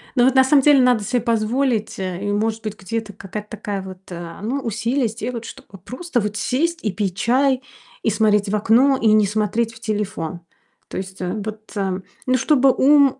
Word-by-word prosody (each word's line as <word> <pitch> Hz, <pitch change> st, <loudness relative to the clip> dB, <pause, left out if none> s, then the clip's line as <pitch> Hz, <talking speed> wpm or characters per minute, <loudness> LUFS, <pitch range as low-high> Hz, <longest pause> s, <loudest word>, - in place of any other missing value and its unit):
Ну, 245 Hz, -2 st, +5 dB
вот 265 Hz, +1 st, +3 dB
на 265 Hz, -, +7 dB
самом 275 Hz, +1 st, +5 dB
деле 290 Hz, -2 st, +6 dB
надо 245 Hz, -4 st, +3 dB
себе 245 Hz, +1 st, 0 dB
позволить, 230 Hz, -1 st, 0 dB
э, 185 Hz, 0 st, -4 dB
и, 205 Hz, -, -1 dB
может 220 Hz, +2 st, -1 dB
быть, 215 Hz, -1 st, -5 dB
где-то 210 Hz, +2 st, -4 dB
какая-то 210 Hz, +2 st, -7 dB
такая 205 Hz, -2 st, -4 dB
вот, 185 Hz, -1 st, -9 dB
э, 170 Hz, -1 st, -7 dB
ну, 255 Hz, +7 st, -2 dB
усилие 235 Hz, +3 st, 0 dB
сделать, 230 Hz, +1 st, -5 dB
чтобы 195 Hz, -, -11 dB
просто 255 Hz, -, -2 dB
вот 210 Hz, -1 st, -2 dB
сесть 325 Hz, +10 st, 0 dB
и 210 Hz, -, 0 dB
пить 190 Hz, -1 st, -2 dB
чай, 260 Hz, +2 st, +2 dB, 0.4 s
и -, -, +2 dB
смотреть 210 Hz, -2 st, +2 dB
в 215 Hz, -, 0 dB
окно, 245 Hz, +6 st, +4 dB
и 225 Hz, -, +3 dB
не 215 Hz, -1 st, +5 dB
смотреть 220 Hz, +2 st, 0 dB
в 225 Hz, -, -14 dB
телефон. 205 Hz, -6 st, -3 dB, 0.5 s
То -, -, -7 dB
есть, 190 Hz, 0 st, -6 dB
э, 180 Hz, 0 st, -2 dB
вот, 215 Hz, +1 st, -6 dB
э, 190 Hz, -2 st, -1 dB, 0.2 s
ну, 255 Hz, 0 st, +3 dB
чтобы 270 Hz, 0 st, +4 dB
ум 280 Hz, -1 st, +4 dB
220 Hz, 200 wpm, -21 LUFS, 205-250 Hz, 0.5 s, на